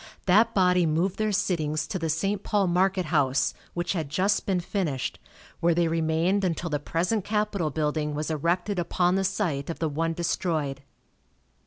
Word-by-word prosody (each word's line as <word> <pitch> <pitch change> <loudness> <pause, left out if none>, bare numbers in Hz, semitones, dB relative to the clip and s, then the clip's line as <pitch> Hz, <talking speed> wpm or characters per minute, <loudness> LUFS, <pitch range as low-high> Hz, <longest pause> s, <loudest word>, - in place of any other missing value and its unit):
That 205 +5 +4
body 180 -2 +4
moved 170 +5 0
their 215 0 +1
sittings 160 -6 0
to 185 - -4
the 165 -1 -2
St. 195 +6 0
Paul 205 -2 +1
market 185 +1 +2
house, 140 -2 +2 0.2
which 175 +1 -1
had 160 -6 -3
just 190 +7 +1
been 190 -2 +1
finished, 170 -7 -2 0.4
where 170 0 +2
they 170 0 +2
remained 165 +4 +1
until 170 -2 -1
the 145 - 0
present 180 +8 -1
capitol 210 -5 0
building 150 0 -1
was 155 +2 -2
erected 175 +5 0
upon 175 +1 +1
the 195 +1 +1
site 175 -8 -1
of 165 - -3
the 160 - -1
one 165 +3 -1
destroyed. 160 -5 -1
170 Hz, 170 wpm, -26 LUFS, 155-190 Hz, 0.4 s, That